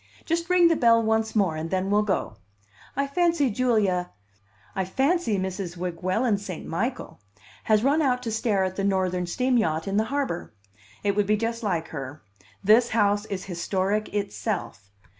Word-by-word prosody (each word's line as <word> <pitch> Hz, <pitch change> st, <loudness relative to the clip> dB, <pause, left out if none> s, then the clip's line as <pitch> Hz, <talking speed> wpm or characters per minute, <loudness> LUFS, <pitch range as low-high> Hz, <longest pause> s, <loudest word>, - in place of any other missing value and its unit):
Just 335 Hz, +1 st, -1 dB
ring 360 Hz, -1 st, +6 dB
the 330 Hz, -, +3 dB
bell 230 Hz, -4 st, +4 dB
once 220 Hz, 0 st, 0 dB
more, 190 Hz, -7 st, +2 dB
and 160 Hz, +1 st, -4 dB
then 190 Hz, +2 st, -1 dB
we'll 210 Hz, +1 st, +4 dB
go. 190 Hz, -, -2 dB, 0.6 s
I 280 Hz, +1 st, +1 dB
fancy 315 Hz, -2 st, +1 dB
Julia 205 Hz, -7 st, +1 dB, 0.6 s
I 190 Hz, -, -1 dB
fancy 265 Hz, -, +1 dB
Mrs. 185 Hz, -2 st, -4 dB
Weguelin 185 Hz, +6 st, 0 dB
St. 190 Hz, -4 st, -7 dB
Michael 230 Hz, -, -4 dB, 0.4 s
has 215 Hz, 0 st, +3 dB
run 285 Hz, +4 st, +3 dB
out 250 Hz, -3 st, +1 dB
to 230 Hz, -, -3 dB
stare 215 Hz, -3 st, +1 dB
at 185 Hz, 0 st, -3 dB
the 195 Hz, -, -1 dB
Northern 185 Hz, -2 st, 0 dB
steam 255 Hz, +7 st, +1 dB
yacht 160 Hz, -6 st, -1 dB
in 195 Hz, +1 st, 0 dB
the 220 Hz, -, +2 dB
harbor. 265 Hz, -, -3 dB, 0.5 s
It 200 Hz, -1 st, +1 dB
would 205 Hz, -1 st, +1 dB
be 215 Hz, 0 st, +3 dB
just 230 Hz, +2 st, -2 dB
like 175 Hz, -7 st, -1 dB
her. 140 Hz, 0 st, -7 dB, 0.4 s
This 225 Hz, +4 st, +5 dB
house 205 Hz, -1 st, +2 dB
is 195 Hz, -3 st, -5 dB
historic 190 Hz, +3 st, -1 dB
itself. 200 Hz, -, -3 dB
205 Hz, 170 wpm, -25 LUFS, 185-240 Hz, 0.6 s, ring